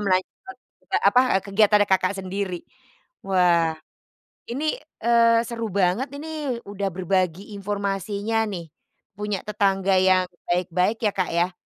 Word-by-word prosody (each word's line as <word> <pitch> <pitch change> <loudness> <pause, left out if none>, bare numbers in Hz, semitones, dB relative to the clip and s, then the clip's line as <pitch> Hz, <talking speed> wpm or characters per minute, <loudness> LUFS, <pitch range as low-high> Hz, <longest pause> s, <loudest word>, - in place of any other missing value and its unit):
melanjutkan, 200 - -2 0.3
eee, - - +1
apa, 250 - +6 0.2
eee, 190 - -1
kegiatannya 205 +1 +4
Kakak 190 +1 +2
sendiri. 190 -1 -3 0.7
Wah, 170 -4 +3 0.7
ini, 305 +5 -1 0.3
eee, 230 -1 +5
seru 230 -2 -4
banget 200 +7 +1
ini, 300 -6 -4
udah 200 -1 -3
berbagi 185 +2 -1
informasinya 200 +2 -2
nih, 170 -5 -6 0.5
punya 210 -2 -2
tetangga 195 -2 +1
yang 185 -1 +4 0.2
baik-baik 180 +4 +1
ya, 210 - +3
Kak, 185 -3 -1
ya. 180 +1 +1
195 Hz, 125 wpm, -24 LUFS, 185-220 Hz, 0.7 s, apa